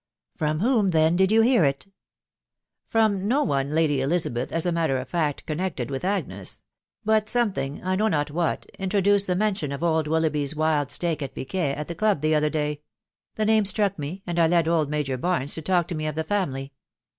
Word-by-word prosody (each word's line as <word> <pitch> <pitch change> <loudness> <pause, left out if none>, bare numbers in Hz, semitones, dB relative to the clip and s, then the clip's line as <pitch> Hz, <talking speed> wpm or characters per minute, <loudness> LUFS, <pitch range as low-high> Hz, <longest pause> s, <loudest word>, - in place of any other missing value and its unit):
(C - - -41
From 155 +1 0
whom, 225 -4 +3
then, 160 0 +3
did 190 +2 +3
you 225 +1 +5
hear 240 -5 +4
it? 140 -1 0 0.3
" - - -68
" - - -60
From 210 -3 +2
no 275 +6 +2
one, 140 -1 0
Lady 150 -3 +1
Elizabeth, 135 -5 -1
as 165 +1 0
a 175 - +1
matter 165 -5 +1
of 130 0 -5
fact 150 -1 -2
con 155 - -3
nected 160 -9 -3
with 135 +3 -4
Agnes. 195 +2 -3 0.4
But 215 0 +2
something, 200 - -1
I 185 +1 0
know 215 +2 +2
not 145 -7 0
what, 165 +1 -1
intro 195 +1 0
duced 200 +1 +3
the 180 - +1
mention 190 -7 0
of 140 +4 -5
old 160 -2 +1
Willoughby's 155 -2 0
wild 155 -2 +1
stake 165 -3 -2
at 135 -2 -5
piquet 140 0 -2
at 150 - -5
the 170 - -4
club 205 -3 +1
the 155 +1 +2
other 150 0 +2
day.... 150 -1 -2 0.5
The 215 - 0
name 220 0 +4
struck 200 -1 +1
me, 165 +7 -5
and 175 -1 -2
I 165 - +5
led 170 -1 +2
old 160 -3 +1
Major 145 -3 -1
Barnes 165 -3 -1
to 160 - -4
talk 175 0 +1
to - - -2
me 155 0 -3
of 155 - -3
the 160 - -1
family. 140 -8 -2
165 Hz, 225 wpm, -25 LUFS, 150-190 Hz, 0.5 s, you